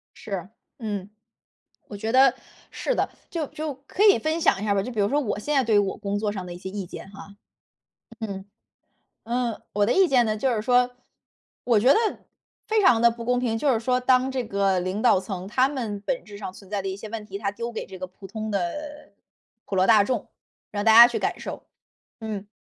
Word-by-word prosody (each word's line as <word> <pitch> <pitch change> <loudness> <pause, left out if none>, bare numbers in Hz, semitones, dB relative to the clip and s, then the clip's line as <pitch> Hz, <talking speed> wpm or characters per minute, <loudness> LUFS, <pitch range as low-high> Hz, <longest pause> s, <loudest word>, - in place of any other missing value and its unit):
是， 195 -3 -6 0.3
嗯， 205 -3 -4 0.8
我 205 - -7
觉 220 +3 -3
得 265 -1 +6 0.4
是 - - -2
的。 - - 0 0.2
就 325 -3 -2
就 305 -2 -5
可 395 - -1
以 405 - +7
分 315 +2 -1
享 195 - +3
一 - - -2
下 205 -1 +1
吧， 195 - +1
就 250 - -5
比 215 - -1
如 200 - +2
说 290 +5 +1
我 220 -7 -2
现 295 +8 -2
在 270 - +3
对 220 -2 +1
于 - - +6
我 200 -1 0
工 205 -1 -3
作 210 -1 -1
上 195 -3 -5
的 175 - -7
一 175 - -8
些 190 - -7
意 195 -2 -5
见 190 - -10
哈。 200 0 -12 0.9
嗯。 200 -3 -5 0.8
嗯， 240 -1 -1
我 205 0 +2
的 235 - +2
意 385 -1 +5
见 255 -5 +4
呢， 215 -1 0
就 265 +4 0
是 215 - -2
说， 250 +1 +3 0.7
我 230 -4 +3
觉 260 +5 +6
得 - - +4 0.7
非 435 0 +3
常 245 - +5
地 235 - +7
不 230 0 -7
公 245 +1 +1
平， 230 -3 -1
就 280 +2 +2
是 225 - 0
说 250 +2 +1
当 255 +1 +3
这 260 -2 -2
个 195 -3 +1
领 185 +4 -2
导 240 -6 +5
层 190 0 -6
他 255 +5 +3
们 230 -8 -4
本 255 +4 -2
质 205 -1 -11
上 195 -3 -6
存 195 0 -15
在 205 -1 -1
的 195 - -6
一 190 - -3
些 210 +2 -9
问 215 -1 -6
题， 200 -1 -7
他 200 -1 -2
丢 235 +3 -5
给 225 - -5
这 190 -1 -10
个 185 - -5
普 190 +2 -13
通 215 +2 -5
的 295 - -4 0.5
普 195 - -5
罗 185 - +3
大 210 0 +6
众， 235 -2 -2 0.4
让 205 0 -3
大 220 -1 +6
家 235 +1 +11
去 - - -2
感 - - -2
受， - - -7 0.6
嗯， 210 -3 -5
220 Hz, 250 characters per minute, -25 LUFS, 200-250 Hz, 0.9 s, 家